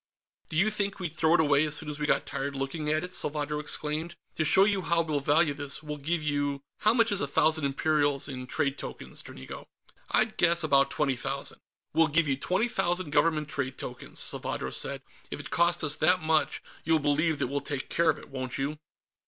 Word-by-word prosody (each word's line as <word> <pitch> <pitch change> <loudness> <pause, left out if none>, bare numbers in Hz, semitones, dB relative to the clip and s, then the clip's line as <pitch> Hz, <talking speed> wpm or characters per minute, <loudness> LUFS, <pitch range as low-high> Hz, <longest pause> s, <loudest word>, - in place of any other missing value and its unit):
"Do 155 - -3
you 210 +6 +4
think 200 -2 -1
we'd 175 -5 -4
throw 160 +1 +3
it - - +3
away 145 -2 +4
as 155 -1 +2
soon 155 - -1
as 150 0 -5
we 150 - -1
got - - +2
tired 140 +1 -4
looking 135 +3 -3
at 155 0 +1
it?" 180 0 -6
Salvadro 150 -1 -2
exclaimed. 155 +3 -3 0.2
"To 155 - 0
show 190 +5 +7
you 200 -2 +1
how 170 -1 +2
we'll 155 -3 -1
value 145 +2 +3
this, 145 +1 -4
we'll 150 -1 -5
give 160 +3 -1
you... 145 -2 -1 0.2
how 215 +2 +3
much 230 -2 +3
is 200 - +1
a 140 - 0
thousand 155 +2 +2
imperials 145 0 +1
in 130 -3 -6
trade 140 +2 0
tokens, - - -7
Dranigo?" 65 - -10 0.4
"I'd 215 0 +1
guess 170 -1 +3
about 140 -3 +4
twenty 140 -3 0
thousand." 135 +2 -5 0.3
"We'll 165 0 +4
give 155 +1 +2
you 135 - +2
twenty 185 - 0
thousand 175 -6 -1
Government 155 0 +2
trade 140 -4 -2
tokens," 125 - -7
Salvadro - - -2
said. - - -2 0.3
"If - - -6
it - - -8
costs 170 0 +2
us 150 -1 +3
that 180 0 +4
much, 155 -2 +1 0.2
you'll 160 0 +3
believe 155 +2 +1
that - - 0
we'll 140 +3 -2
take 140 -1 -4
care 170 -1 +2
of 155 - +2
it, - - -13
won't 130 -2 -4
you?" 145 +3 -3
150 Hz, 215 wpm, -28 LUFS, 140-165 Hz, 0.4 s, show